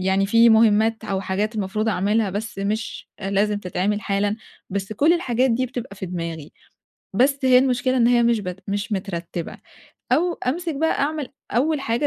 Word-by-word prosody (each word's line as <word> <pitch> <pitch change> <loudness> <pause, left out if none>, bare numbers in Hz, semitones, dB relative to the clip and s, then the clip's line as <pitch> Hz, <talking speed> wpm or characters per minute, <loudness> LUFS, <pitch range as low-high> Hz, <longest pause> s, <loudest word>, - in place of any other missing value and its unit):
يعني 190 +1 +1
في 230 +3 +5
مُهمات 220 0 +4
أو 195 -2 -2
حاجات 200 +4 -2
المفروض 210 +1 -1
أعملها، 210 +1 +1
بس 205 +2 -5
مش 210 +3 -3
أ 195 -1 -3
لازم 205 +1 +1
تتعمل 200 +2 -1
حالًا. 205 0 0 0.3
بس 195 +1 -3
كل 295 +10 +3
الحاجات 260 -6 +1
دي 250 +3 +1
بتبقى 245 -4 -7
في 190 - -5
دماغي. 165 -3 -5 0.6
بس 275 +6 +3
هي 255 -1 +7
المشكلة 255 0 +1
إن 235 -1 +4
هي 240 -1 +4
مش 235 -2 +2
بت 180 -1 -6
مش 205 +2 -2
مترتِّبة. 175 -3 -4 0.5
أو 345 +5 +2
أمسِك 330 +3 -1
بقى 320 +3 0
أعمل 295 -1 -1 0.2
أول 290 +6 +1
حاجة 240 +2 0
215 Hz, 175 wpm, -22 LUFS, 195-250 Hz, 0.6 s, هي